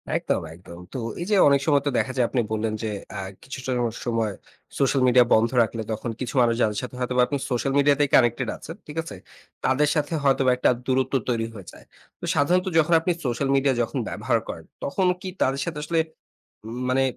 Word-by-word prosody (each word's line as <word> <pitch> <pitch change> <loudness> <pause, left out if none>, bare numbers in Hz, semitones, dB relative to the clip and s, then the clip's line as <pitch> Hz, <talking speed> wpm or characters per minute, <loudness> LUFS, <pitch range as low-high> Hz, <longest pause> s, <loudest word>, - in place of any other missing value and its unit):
একদম, - - 0
একদম। 85 0 -12
তো - - -3 0.2
এই 175 - -3
যে - - +5
অনেক 140 -1 +4
সময় 145 -2 +4
তো - - +4
দেখা 130 - 0
যায় 125 - +3
আপনি 125 - +1
বললেন 110 0 -1
যে - - -1 0.2
অ্যা 100 - -5 0.2
কিছুটা 130 -1 -6 0.3
সময় 115 -3 0 0.5
সোশ্যাল 135 0 +2
মিডিয়া 125 0 +6
বন্ধ 115 +1 +4
রাখলে 115 0 -4
তখন 110 +2 -3
কিছু 130 +1 -4
মানুষ 115 -1 +3
যাদের 105 -2 +1
সাথে 125 - -7
হয়তোবা 125 0 +1
আপনি 145 - -1
সোশ্যাল 135 +2 0
মিডিয়াতেই 145 0 +3
কানেক্টেড 120 -2 +3
আছেন, 165 - -9
ঠিক 150 +1 -9
আছে? 130 - -8 0.5
তাদের 140 +3 +3
সাথে 150 +1 -1
হয়তোবা 135 -2 +3
একটা - - +3 0.2
দূরত্ব 130 0 0 0.2
তৈরি 115 -2 0
হয়ে 100 -4 -10
যায়। - - -16 0.3
তো - - -6
সাধারণত 180 +6 +2
যখন 160 +2 +3
আপনি 165 +3 0
সোশ্যাল 125 +2 -1
মিডিয়া 135 0 +3
যখন 120 +4 -2
ব্যবহার 115 +2 0
করেন, 80 -1 -7 0.2
তখন 185 +7 0 0.2
কী 190 - -5
তাদের 135 +1 +1
সাথে - - -4
আসলে 165 +2 0 0.7
উম 115 +2 -6
মানে 130 +1 +3
130 Hz, 200 wpm, -24 LUFS, 115-140 Hz, 0.7 s, মিডিয়া